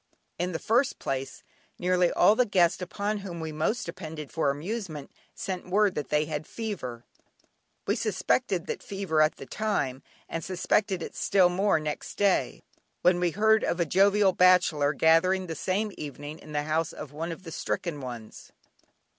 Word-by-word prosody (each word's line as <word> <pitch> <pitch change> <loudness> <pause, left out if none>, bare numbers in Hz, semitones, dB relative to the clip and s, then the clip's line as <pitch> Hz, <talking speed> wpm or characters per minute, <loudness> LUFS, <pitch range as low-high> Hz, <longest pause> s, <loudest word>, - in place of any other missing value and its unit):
In 180 +1 -1
the 165 - -2
first 245 +9 +1
place, 135 0 -4 0.3
nearly 180 0 +2
all 205 +4 +5
the 250 - +4
guests 180 -3 +3
upon 205 +3 -2
whom 185 -4 -7
we 160 -1 -4
most 155 +10 -1
depended 160 -4 -7
for 160 -3 +1
amusement 155 0 -4 0.2
sent 185 -1 -5
word 200 +1 +3
that 150 - -4
they 150 0 +2
had 155 0 -4
fever. 130 - -5 0.8
We 205 - +1
suspected 215 -3 0
that - - -4
fever 195 -6 -1
at 155 0 +3
the - - -9
time, 145 -12 -2 0.3
and 165 - -4
suspected 185 0 0
it - - -8
still 190 -3 +4
more 190 0 +2
next 150 -1 -5
day, 200 -2 +1 0.4
when 180 0 +4
we 175 -1 +2
heard 220 +5 +3
of 175 - 0
a 170 - +2
jovial 195 +3 +4
bachelor 180 -6 +4
gathering 165 +5 +3
that 165 -3 -5
same 205 +6 -1
evening 145 +1 -7
in 155 - -13
the 145 0 -1
house 155 +1 -1
of 150 -2 -8
one 165 +3 -4
of 165 +3 -8
the 165 - -8
stricken 160 -1 -3
ones. 120 -4 -9
175 Hz, 170 wpm, -27 LUFS, 155-195 Hz, 0.8 s, all